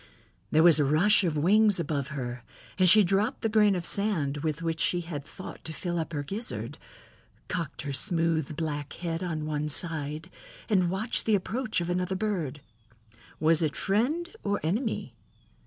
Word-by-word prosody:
There 155 +1 +4
was 170 -3 +7
a - - +4
rush 175 +10 +4
of 165 -4 0
wings 205 +5 +4
above 145 -4 -2
her 125 -4 -5 0.4
and 185 -1 +6
she 210 +3 +9
dropped 200 +7 +1
the 225 - 0
grain 210 -2 +4
of 175 -2 -3
sand 170 -10 0
with 155 +1 -3
which 165 -1 -2
she 175 - +2
had 165 -4 -6
thought 170 +6 -10
to 160 - -5
fill 175 +1 -3
up 160 - -4
her 145 -3 -3
gizzard, 210 - -4 0.7
cocked 170 -7 -4
her 140 -1 -4
smooth 165 -2 +1
black 145 -2 -4
head 170 -1 -4
on 160 -4 -3
one 150 0 -2
side 155 +2 -2 0.4
and 185 -5 +2
watched 205 +6 -2
the 220 - +4
approach 220 +2 -2
of 170 - -3
another 180 +1 -1
bird. 180 -9 -2 0.8
Was 160 +1 +3
it 155 -3 0
friend 295 - -1
or 200 0 0
enemy? 215 - -2
170 Hz, 170 wpm, -28 LUFS, 155-200 Hz, 0.8 s, she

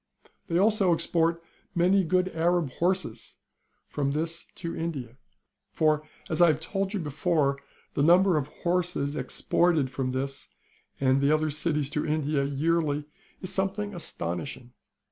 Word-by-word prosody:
They 170 -2 +1
also 200 -3 +4
export 165 0 0 0.3
many 185 +3 +4
good 185 +2 +1
Arab 170 -3 +1
horses 180 -7 -1 0.5
from 140 -1 -2
this 165 +2 -3
to 170 - -5
India.^ 140 -8 -4 0.6
For, 155 -1 +3 0.3
as 160 +1 -1
I 175 - +8
have 155 -2 +2
told 195 +4 -2
you - - 0
before, 150 -2 0 0.3
the - - 0
number 175 +4 +5
of 145 -3 0
horses 170 -3 -1
exported 150 +1 +1
from 130 0 -2
this 135 +1 -4 0.5
and 135 0 +3
the 140 +1 +3
other 155 0 +2
cities 150 -2 -1
to 150 - -1
India 150 -2 0
yearly 150 +1 0 0.4
is 185 +1 -1
something 195 +2 -1
astonishing. 120 - -5
160 Hz, 140 wpm, -27 LUFS, 140-175 Hz, 0.6 s, I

